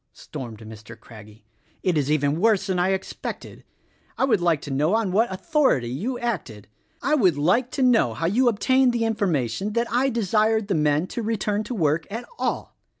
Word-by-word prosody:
stormed 115 -4 -8
Mr. 110 0 -11
Craggie, 110 -1 -15 0.4
"it 180 -3 +1
is 145 -2 0
even 150 0 +1
worse 215 -3 +3
than 190 -2 -1
I 180 +1 +2
expected. 190 0 -5 0.5
I - - +2
would 220 -8 +2
like 170 -3 +2
to 145 - -7
know 150 +9 +1
on 225 -4 0
what 220 +3 +2
authority 190 - +1
you 215 - -3
acted! 160 - -4 0.4
I 280 +4 +1
would 190 - +3
like 185 - +2
to 270 - 0
know 225 - +3
how 165 - -3
you 235 +9 +2
obtained 260 +3 +2
tihe 230 - 0
information 195 - -1
that 235 +1 +1
I 255 +3 +2
desired 220 -1 +1
the - - +2
men 150 0 +1
to 235 - -5
return 210 -1 -1
to 250 - -5
work 155 -3 0
at 230 +4 -5
all! - - -3
190 Hz, 190 wpm, -24 LUFS, 145-230 Hz, 0.5 s, worse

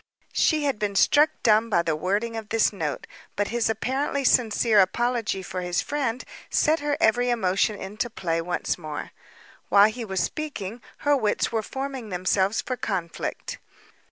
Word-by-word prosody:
She 310 -2 +2
had 275 -7 0
been 205 -1 -2
struck 295 +9 +5
dumb 220 -1 +4
by 170 -5 +2
the 160 -2 0
wording 205 +8 -1
of 220 -1 -6
the 225 -1 +3
note, 155 -7 -3 0.3
but 205 0 -1
his 235 -1 0
apparently 265 +5 -1
sincere 230 -3 +3
apology 225 0 +1
for 185 +1 -5
his 175 -1 -1
friend 260 -5 -2 0.3
set 315 +1 +2
her 290 0 -1
every 245 -7 +3
emotion 210 -2 +1
into 210 +5 -4
play 165 -7 -2
once 175 +1 -2
more. 155 -3 -6 0.6
While 205 +1 +7
he 240 +2 -6
was 190 -3 -2
speaking, 240 -8 -5 0.2
her 290 0 +5
wits 215 -6 0
were 225 -1 0
forming 265 0 -5
themselves 190 +3 +1
for 255 - -3
conflict. 180 -7 -4
220 Hz, 160 wpm, -25 LUFS, 190-250 Hz, 0.6 s, While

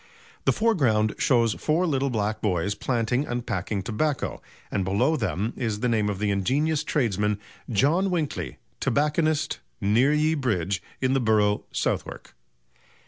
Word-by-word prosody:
The - - +5
foreground 130 - +2
shows 115 -4 +3
four 160 +4 +1
little 140 -4 +1
black 110 -2 -1
boys 95 -1 0
planting 125 +5 -1
and 120 0 -3
packing 95 +2 -2
tobacco, 125 +6 -1 0.3
and 100 - 0
below 105 - +2
them 110 - -1
is 110 -4 -2
the 125 - +2
name 110 -3 +1
of 100 - -2
the 105 +1 0
ingenious 145 +11 +1
tradesman 105 - 0 0.3
"John 150 - +2
Winkley, 165 -5 -2 0.2
Tobacconist, 155 +1 +1 0.2
near 115 +8 +3
ye 155 +1 +2
Bridge, 100 - -1 0.2
in 130 0 +2
the 135 - +3
Burrough, 105 -2 +2
Southwark." - - -3
120 Hz, 140 wpm, -25 LUFS, 105-150 Hz, 0.3 s, The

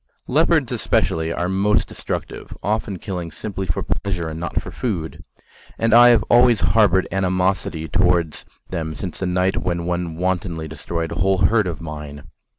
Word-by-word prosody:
Leopards - - +2
especially 80 0 0
are 85 +1 -1
most 100 +3 +2
destructive, - - -6
often 105 -1 -1
killing 90 -3 -5
simply 95 +3 -5
for 85 - -1
pleasure 90 -5 -2
and 80 +1 -6
not 85 - -2
for - - -8
food: 90 -10 -4 0.5
and 115 -1 +1
I 120 +1 +9
have 120 - +5
always 120 -3 +5
harboured 95 +2 +3
animosity 90 -3 0
towards 85 0 +1 0.3
them 80 -3 -3
since 90 -3 -6
the 95 - -1
night 90 +1 +1
when 85 -1 -2
one 85 -2 -2
wantonly 90 -2 -2
destroyed 80 +2 -4
a - - -4
whole 95 +1 +2
herd 110 +1 +3
of 85 -3 -5
mine. 75 -3 -7
90 Hz, 160 wpm, -21 LUFS, 80-95 Hz, 0.5 s, I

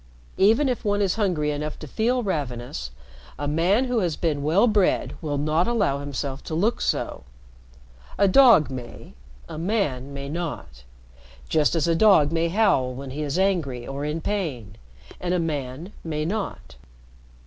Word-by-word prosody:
Even 225 +9 +4
if 250 -2 -2
one 205 -2 +1
is 195 -3 +2
hungry 175 -9 0
enough 150 +1 -4
to - - -9
feel 240 - 0
ravenous, 120 - -3 0.5
a 145 - -3
man 175 - +2
who 245 -2 0
has 175 -6 0
been 150 -4 -1
well 160 +10 +3
bred 210 -5 +2
will 145 -3 -2
not 155 +4 +1
allow 205 -13 +1
himself 140 -1 -5
to 160 - -4
look 210 +8 +1
so. - - -2 0.9
A 200 - +4
dog 225 - +6
may, 120 -3 -8 0.3
a 155 - -7
man 160 - -1
may 140 0 -6
not. 140 - -6 0.6
Just 155 +1 +2
as 165 -1 +1
a 165 - +3
dog 165 -5 +5
may 165 0 +1
howl 170 - +2
when 135 0 -7
he 145 +3 -5
is 145 +1 -2
angry 165 -11 0
or 140 +2 -5
in 150 +2 -2
pain 145 - -3 0.4
and 180 0 -1
a - - +1
man 150 +2 -4
may 155 -2 -3
not." 195 - -4
160 Hz, 165 wpm, -24 LUFS, 140-195 Hz, 0.9 s, dog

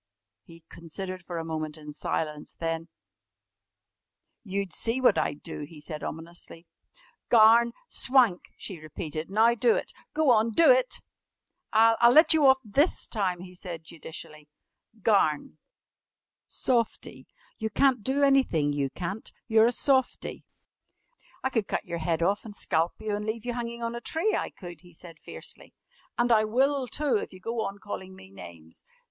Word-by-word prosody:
He 165 -2 -16
considered 185 +3 -7
for 175 -1 -6
a 165 - -4
moment 155 -1 -4
in 150 -1 -10
silence. 150 0 -3
Then: 165 0 -3 1.6
"You'd 195 -2 -3
see 230 +8 -1
what 260 - +5
I'd 145 - -2
do!" - - -7
he 150 +1 -9
said 150 0 -7
ominously. 165 +1 -8 0.6
"Garn! 235 +1 +6 0.2
Swank!" 250 - +2
she 185 -4 -7
repeated. 155 +1 -6
"Now 220 +4 +4
do 455 - +3
it! - - -3 0.2
Go 310 -4 +4
on, 225 -1 +4
do 335 - +7
it!" - - +2 0.7
"I'll 225 +2 +5
let 310 +4 +7
you 305 -3 +5
off 265 0 +7
this 280 - +1
time," 185 -5 -1
he 180 0 -11
said 175 -3 -7
judicially. 155 -1 -10 0.5
"Garn! 175 -9 +2 0.9
Softie. 235 -3 -2 0.3
You 220 - -2
can't 255 +1 +2
do 270 +4 +1
anything, 255 - +3
you 140 -1 -1
can't! 185 +8 -5 0.2
You're 225 -1 +5
a - - +2
softie!" 260 +1 0 1.0
"I 265 - 0
could 225 -5 0
cut - - -2
your 170 - -4
head 165 0 0
off 200 +4 +1
an' 220 - -9
scalp 165 -3 0
you 215 -1 -2
an' 210 - -4
leave 220 +1 -3
you 245 - -2
hanging 235 0 -5
on 230 0 -2
a 235 - -6
tree, 330 - 0
I - - -2
could," 175 -4 -11
he 175 -2 -18
said 165 -2 -12
fiercely, - - -10 0.4
"an' 240 0 +2
I 215 -2 +5
will, 265 +4 +1
too, 275 0 +1
if - - -5
you 185 - -12
go 230 +4 -3
on 195 - -5
calling 190 -2 -7
me 95 - -15
names." 85 -4 -13
200 Hz, 165 wpm, -27 LUFS, 165-235 Hz, 1.6 s, do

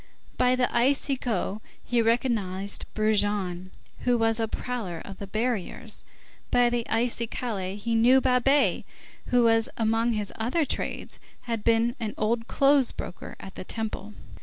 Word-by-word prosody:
By 250 0 +3
the 250 0 +3
icigo 245 -5 +1 0.3
he 240 -1 +2
recognized 220 -5 0
Brujon, 205 -4 +1 0.3
who 245 -1 +2
was 225 0 +2
a 225 - +1
prowler 220 -7 -4
of 195 -1 -9
the 200 - -6
barriers, 220 -1 -2 0.5
by 245 -1 +4
the 240 -1 -1
icicaille 225 -4 -1
he 230 +3 -2
knew 240 +4 +6
Babet, 265 +2 +3 0.4
who, 245 -1 +4 0.3
among 225 +1 +2
his 210 -2 -2
other 255 +9 +1
trades, - - -4 0.2
had 230 -3 -3
been 230 +1 +3
an 220 -3 -3
old 225 +2 0
clothes 275 -2 +4
broker - - -7
at 195 - -9
the - - -7
Temple. 215 0 -5
230 Hz, 135 wpm, -27 LUFS, 210-245 Hz, 0.5 s, knew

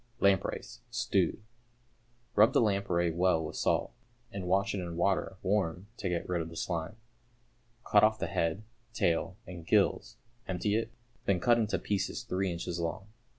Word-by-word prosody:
=Lampreys, 100 -3 +1
Stewed.= - - 0 0.9
Rub 110 +5 +6
the - - +5
lamprey 100 -6 +1
well 85 -1 +2
with 75 - -6
salt, - - 0 0.4
and 95 -2 -5
wash 95 +2 +2
it 100 - -2
in 85 -2 -5
water 95 +1 +1
(warm) 95 -1 0
to 95 - -2
get 85 -1 -2
rid 90 -2 0
of 80 - -5
the 80 - -11
slime. 85 +3 -3 0.9
Cut 105 - +5
off 110 0 +4
the - - -2
head, 85 +5 -1 0.3
tail, 85 +2 +1
and 90 -2 -8
gills, - - +2 0.3
empty 95 +2 -1
it, 115 0 0 0.4
then 95 -2 +2
cut 120 +6 +4
into 110 -1 +1
pieces 100 +4 -2
three 95 -4 -1
inches 85 0 -4
long. 85 +4 -3
95 Hz, 160 wpm, -31 LUFS, 85-100 Hz, 0.9 s, Rub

